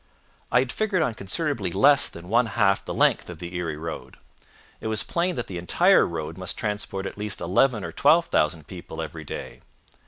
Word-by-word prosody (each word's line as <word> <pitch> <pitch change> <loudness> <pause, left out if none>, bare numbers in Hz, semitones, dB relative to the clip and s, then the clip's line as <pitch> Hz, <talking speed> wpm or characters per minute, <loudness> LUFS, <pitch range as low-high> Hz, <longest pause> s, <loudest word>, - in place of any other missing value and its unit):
I 125 - +4
had 130 -1 -3
figured 200 -6 0
on 125 - -1
considerably 110 - -2
less 140 +10 +5
than 85 +1 -11
one 115 +4 +3
half 100 -1 +2
the - - -6
length - - +2
of - - -8
the 85 +1 -8
Erie 85 -4 -3
road. 80 +1 -7 0.6
It - - -5
was 110 -1 +2
plain 175 +2 -1
that 120 - -3
the 90 -2 -6
entire 85 - +4
road 80 0 -5
must 95 - -3
transport 105 -2 -3
at 95 - -7
least 105 -1 -2
eleven 105 +4 +2
or 80 - -5
twelve 170 - +4
thousand 75 - 0
people - - -9
every - - -6
day. - - -7
100 Hz, 195 wpm, -25 LUFS, 85-125 Hz, 0.6 s, less